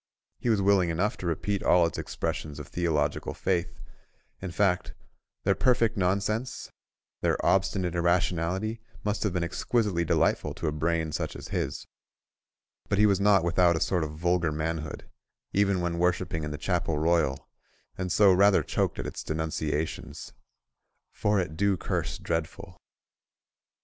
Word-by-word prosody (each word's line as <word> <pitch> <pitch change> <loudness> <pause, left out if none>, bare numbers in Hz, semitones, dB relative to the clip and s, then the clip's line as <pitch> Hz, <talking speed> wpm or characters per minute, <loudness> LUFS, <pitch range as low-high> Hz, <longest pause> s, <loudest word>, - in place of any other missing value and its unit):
He 120 - -1
was 105 -4 +2
willing 95 -3 +4
enough 90 +6 0
to 90 - -5
repeat 95 +4 -1
all 90 -1 +4
its 85 - -3
expressions 75 -2 -4
of 75 0 -8
theological 75 -4 -1
faith—in 90 +1 -5
fact, 90 +1 0 0.5
their 100 - +3
perfect 115 -1 +2
nonsense, 100 +5 -1 0.5
their - - +2
obstinate 95 -2 +2
irrationality, 90 +5 0 0.2
must 105 0 -1
have 105 - +1
been 90 -1 -1
exquisitely 95 0 0
delightful 80 - +1
to - - -5
a 75 - +1
brain 80 +1 -1
such - - -3
as - - -9
his; - - -3 1.0
but 100 - +1
he 105 - +5
was 100 -2 +3
not 100 -3 +5
without 85 0 +3
a - - 0
sort 90 -1 +1
of 75 -1 -4
vulgar 85 -1 +1
manhood, 80 0 -4 0.5
even 100 -2 +2
when 85 -1 -2
worshipping 90 -2 0
in 75 - -3
the 75 - -5
Chapel 85 0 -1
Royal, 80 -4 +1 0.5
and 90 -1 -3
so 100 0 +6
rather 100 +2 +5
choked - - -1
at - - -4
its - - -5
denunciations—"for 80 +5 -4
it 90 -4 -3
do 100 +2 +2
curse - - -2
dreadful." 85 +3 -4
90 Hz, 145 wpm, -28 LUFS, 80-100 Hz, 1.0 s, so